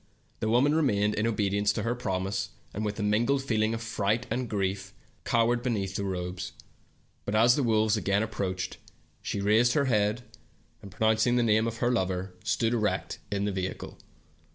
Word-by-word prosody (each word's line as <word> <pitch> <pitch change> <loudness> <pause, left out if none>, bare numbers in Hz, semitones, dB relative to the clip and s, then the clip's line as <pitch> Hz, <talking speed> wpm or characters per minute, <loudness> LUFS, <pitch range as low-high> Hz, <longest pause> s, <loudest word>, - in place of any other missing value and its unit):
The 110 - -1
woman 130 +6 +4
remained, 105 -10 +2
in 110 +2 0
obedience 100 -2 +1
to - - -3
her 115 - 0
promise, 95 -5 -2 0.2
and 105 - -3
with 105 0 -3
a - - -1
mingled 120 +7 +2
feel 110 -5 0
ing 110 +1 +1
of 115 - -6
fright 110 -1 0
and 125 -2 -1
grief 100 -1 -2 0.3
cowered 120 0 +2
beneath 100 -6 -2
the 100 - -1
robes. 90 -1 -4 0.7
But 100 - -2
as 120 +3 +5
the 145 - +1
wolves 110 -3 +2
again 100 0 +1
approached, 95 -4 -3 0.4
she 100 - -3
raised 110 +4 +4
her 145 -2 +2
head, 110 -1 +1 0.6
and 100 - -10
pronouncing 110 +4 +2
the 120 - +3
name 110 0 +3
of 115 0 -4
her 120 +2 +1
lover, 95 -4 -1
stood 115 0 +1
erect 105 -3 -1
in 100 0 0
the 105 - 0
vehicle. 95 -1 -5
110 Hz, 180 wpm, -28 LUFS, 100-120 Hz, 0.7 s, as